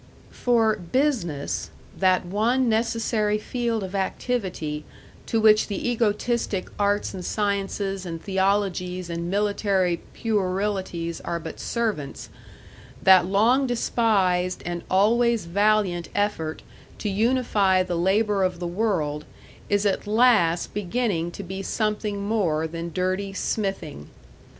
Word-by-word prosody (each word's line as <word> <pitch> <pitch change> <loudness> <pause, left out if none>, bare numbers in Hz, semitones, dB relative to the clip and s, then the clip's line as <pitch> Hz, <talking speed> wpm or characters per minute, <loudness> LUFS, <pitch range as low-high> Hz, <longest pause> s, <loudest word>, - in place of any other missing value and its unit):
For 225 -3 +2
"business," 175 - -1 0.3
that 185 -1 +2
one 230 +7 +1
necessary 225 -1 +1
field 230 0 -2
of 190 0 -6
activity 190 -6 -2 0.4
to 225 - +1
which 215 -1 +5
the 205 +3 -3
egotistic 220 -3 0
arts 205 0 +1
and 185 -2 -6
sciences 200 -1 -1
and 165 -3 -5
theologies 190 -2 -1
and 170 +1 -3
military 200 -3 +1 0.2
puerilities 190 -5 -1
are 170 - -2
but 160 0 -8
servants, 215 - -3 0.7
that 185 -2 +7
long 235 +8 +3
despised 195 -7 +1
and 175 0 -3
always 230 +3 +3
valiant 200 -1 +1
effort 200 -6 -1 0.3
to - - -4
unify 205 -3 +2
the 180 -1 -4
labor 195 +3 +2
of 180 -1 0
the 175 - -4
world, 170 -6 -1 0.5
is 205 0 +2
at 200 0 0
last 210 -7 +3
beginning 205 -4 -1
to 185 +3 -8
be 190 +1 -5
something 210 0 -2
more 185 -8 0
than 165 +1 -5
dirty 185 +3 -1
smithing. 195 - -3
200 Hz, 115 wpm, -24 LUFS, 180-215 Hz, 0.7 s, that